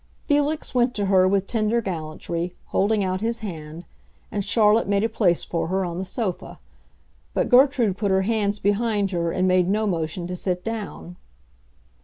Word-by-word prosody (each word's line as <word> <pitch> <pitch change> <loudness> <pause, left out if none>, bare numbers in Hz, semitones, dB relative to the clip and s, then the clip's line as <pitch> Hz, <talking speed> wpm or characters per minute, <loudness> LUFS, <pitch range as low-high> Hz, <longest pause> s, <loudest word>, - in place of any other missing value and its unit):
Felix 295 +1 0
went 245 0 +2
to 205 - 0
her 190 -1 +4
with 195 0 +1
tender 220 +1 0
gallantry, 170 -2 -4
holding 205 +1 +1
out 185 0 -2
his 230 +1 -2
hand, 165 -4 -7 0.5
and 205 - -2
Charlotte 215 +1 +3
made 200 0 +1
a - - +3
place 200 -6 +1
for 170 - -2
her 190 +2 0
on 175 0 -4
the 190 - -3
sofa. 190 -1 -4 0.8
But - - +1
Gertrude 250 -6 +4
put 205 - 0
her 190 0 +2
hands 210 -1 0
behind 205 0 0
her 170 -2 -1
and 185 +1 +1
made 185 -1 +3
no 215 +2 +1
motion 170 -2 -2
to 180 +1 -4
sit 180 0 -2
down. 210 -5 -6
200 Hz, 175 wpm, -23 LUFS, 180-220 Hz, 0.8 s, her